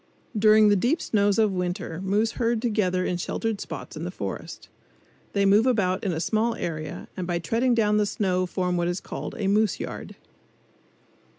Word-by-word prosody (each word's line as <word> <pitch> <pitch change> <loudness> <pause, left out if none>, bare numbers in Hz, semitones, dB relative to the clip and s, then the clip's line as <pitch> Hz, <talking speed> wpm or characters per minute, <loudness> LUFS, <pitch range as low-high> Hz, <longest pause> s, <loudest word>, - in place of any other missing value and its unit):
During 215 0 +6
the 205 - +5
deep 245 - +1
snows 205 -1 +1
of 215 -2 +3
winter 180 -2 -3
moose 210 +4 +1
herd 235 -1 0
together 205 -6 0
in 180 - -1
sheltered 220 +4 -2
spots - - -7
in - - -5
the - - -3
forest. - - -6 0.7
They 200 -1 +2
move 205 +5 +5
about 195 -7 +1
in 195 - 0
a 160 - -2
small 225 +6 +1
area 155 -2 -5
and 180 -2 -4
by 175 -1 0
treading 230 +9 +1
down 210 -2 +3
the 210 -1 +2
snow 185 -3 0
form 180 -1 -1
what 175 0 0
is 175 +1 -1
called - - -6
a 205 - -2
"moose 210 -1 +2
yard." - - -6
205 Hz, 185 wpm, -25 LUFS, 180-220 Hz, 0.7 s, During